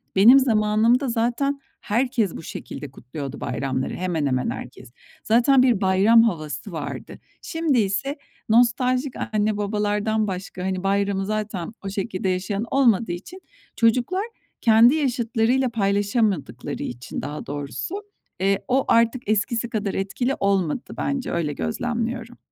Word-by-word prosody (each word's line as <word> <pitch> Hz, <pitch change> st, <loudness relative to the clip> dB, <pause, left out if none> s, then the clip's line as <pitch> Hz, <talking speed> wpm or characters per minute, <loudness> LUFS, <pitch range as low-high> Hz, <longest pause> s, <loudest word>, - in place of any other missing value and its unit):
benim 235 Hz, +8 st, +8 dB
zamanımda 225 Hz, +2 st, +3 dB
zaten 245 Hz, +5 st, 0 dB, 0.2 s
herkes 235 Hz, -3 st, 0 dB
bu -, -, -8 dB
şekilde 145 Hz, -2 st, -7 dB
kutluyordu 135 Hz, +2 st, -7 dB
bayramları, 130 Hz, -1 st, -2 dB
hemen 175 Hz, -4 st, -1 dB
hemen 130 Hz, -2 st, 0 dB
herkes. -, -, -8 dB, 0.3 s
Zaten 250 Hz, +4 st, +4 dB
bir 235 Hz, -6 st, +3 dB
bayram 200 Hz, +5 st, +5 dB
havası 160 Hz, -, -3 dB
vardı. 160 Hz, -, -6 dB, 0.2 s
Şimdi 325 Hz, -6 st, 0 dB
ise 270 Hz, +9 st, -1 dB, 0.3 s
nostaljik 250 Hz, +3 st, +3 dB, 0.2 s
anne 210 Hz, 0 st, +1 dB
babalardan 210 Hz, +1 st, 0 dB
başka, 185 Hz, -1 st, -5 dB
hani, 185 Hz, 0 st, -2 dB
bayramı 195 Hz, 0 st, +1 dB
zaten 215 Hz, -2 st, -3 dB
o 195 Hz, -, -2 dB
şekilde 190 Hz, -1 st, -2 dB
yaşayan 195 Hz, +3 st, -1 dB
olmadığı 230 Hz, -8 st, +3 dB
için 345 Hz, -, -8 dB, 0.3 s
çocuklar 250 Hz, -, +2 dB, 0.4 s
kendi 230 Hz, +4 st, +6 dB
yaşıtlarıyla 245 Hz, -2 st, +1 dB
paylaşamadıkları 200 Hz, -, -1 dB
için 120 Hz, +1 st, -6 dB
daha 145 Hz, +2 st, -6 dB
doğrusu, 145 Hz, -, -5 dB, 0.4 s
eee, 195 Hz, +1 st, +2 dB
o 265 Hz, +2 st, +2 dB
artık 230 Hz, 0 st, +2 dB
eskisi 220 Hz, +3 st, 0 dB
kadar 210 Hz, -3 st, -2 dB
etkili 245 Hz, +7 st, -1 dB
olmadı 195 Hz, 0 st, 0 dB
bence, 275 Hz, -2 st, -2 dB
öyle 160 Hz, -4 st, -1 dB
gözlemliyorum. 230 Hz, -, -3 dB
215 Hz, 125 wpm, -23 LUFS, 190-240 Hz, 0.4 s, benim